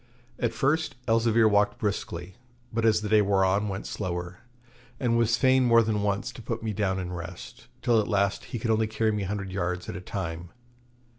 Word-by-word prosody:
At 120 -2 +1
first 150 +6 0
Elzevir 115 0 +4
walked 105 0 +2
briskly, 95 -3 -3 0.4
but 115 0 0
as 110 -1 +4
the 105 - -3
day 110 0 +5
wore 100 -1 +3
on 100 +3 +1
went 95 0 -4
slower, 90 -2 -4 0.6
and 120 -2 +1
was 115 0 +3
fain 130 0 +4
more 115 -1 +5
than 105 -2 0
once 100 +4 -1
to 125 - -11
put 115 0 -4
me 110 -1 -2
down 95 -2 0
and 90 -1 -4
rest, 85 -7 -9 0.2
till 115 -2 +4
at - - -4
last 100 -2 0
he - - -5
could 115 0 -1
only 110 0 +2
carry 110 0 0
me 105 -1 -2
a 95 - -3
hundred 100 -1 -4
yards 90 -1 -2
at - - -5
a 90 - -6
time. 85 -3 -5
105 Hz, 210 wpm, -27 LUFS, 95-115 Hz, 0.6 s, day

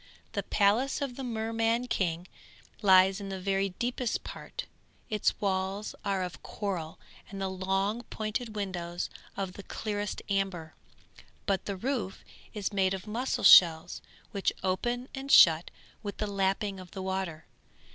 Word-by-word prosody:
The - - -1
palace 220 +7 +2
of 275 -4 -3
the 270 - -6
Merman 225 0 0
King 180 -6 -1 0.5
lies 190 0 +6
in 200 - -5
the 190 -1 -4
very 195 +1 0
deepest 240 +4 -2
part; - - -7 0.5
its 210 -1 +1
walls 195 +1 -1
are 195 -2 0
of 180 -5 -6
coral 180 -7 -4 0.3
and 195 - -7
the 190 -1 -2
long 195 +4 0
pointed 215 +1 -3
windows 175 -4 -3 0.3
of 190 -2 -3
the 200 - -8
clearest 205 +1 -4
amber, 195 -5 -1 0.7
but 195 -2 0
the 200 -2 -3
roof 235 -3 -3 0.3
is 210 -1 -3
made 195 -1 +2
of 190 - -8
mussel 235 +5 -2
shells 165 -1 +7 0.3
which 200 -3 +1
open 240 +7 -1
and 275 0 -4
shut 165 0 +8 0.3
with 205 -2 -5
the 215 - -1
lapping 195 0 0
of 185 -1 -10
the 190 0 -6
water. 190 -4 -3
195 Hz, 145 wpm, -30 LUFS, 190-215 Hz, 0.7 s, shut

